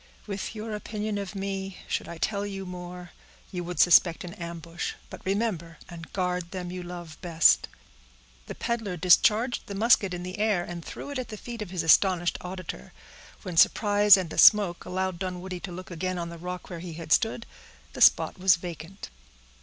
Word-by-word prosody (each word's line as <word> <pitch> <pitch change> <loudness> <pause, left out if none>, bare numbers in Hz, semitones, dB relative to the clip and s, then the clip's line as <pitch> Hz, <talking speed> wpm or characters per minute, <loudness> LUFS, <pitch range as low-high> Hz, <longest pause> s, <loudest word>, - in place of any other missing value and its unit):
With 200 +1 -5
your 215 0 -5
opinion 210 0 -3
of 200 0 -6
me, 195 -1 -4
should - - -2
I 170 - -7
tell 200 +4 -1
you 195 -1 -5
more, 180 -1 -8 0.4
you 180 -2 -4
would 175 -2 -6
suspect 170 -1 +5
an 175 - -7
ambush. 170 -2 -6 0.2
But - - -10
remember 190 -5 -2
and 165 -1 -10
guard 180 -2 -2
them 180 -1 -5
you 180 0 -5
love 175 -2 -9
best." 165 - +4 0.8
The - - -6
peddler 225 -6 -3
discharged 215 +7 +3
the 200 - -6
musket 210 -2 +4
in 175 - -6
the 185 +3 -6
air, 210 -5 +2
and 175 -1 -7
threw 285 - -8
it 280 - -3
at 255 - -4
the 215 - -8
feet 235 +1 -8
of 210 - -5
his 180 -2 -2
astonished 175 +2 +3
auditor. 180 - -7 0.5
When 180 -3 -6
surprise 205 +2 +6
and 180 -4 -3
the - - -3
smoke 200 -5 +6
allowed 185 -1 -2
Dunwoodie 185 -1 -5
to 185 - -9
look 185 +1 -9
again 185 +2 -3
on 170 -1 -4
the 170 0 -9
rock 180 +2 -7
where 170 - -5
he 170 -1 -7
had 160 -1 -9
stood, 230 +3 +2 0.5
the - - -7
spot - - +5
was 185 -2 +5
vacant. 170 - -8
180 Hz, 190 wpm, -27 LUFS, 175-200 Hz, 0.8 s, surprise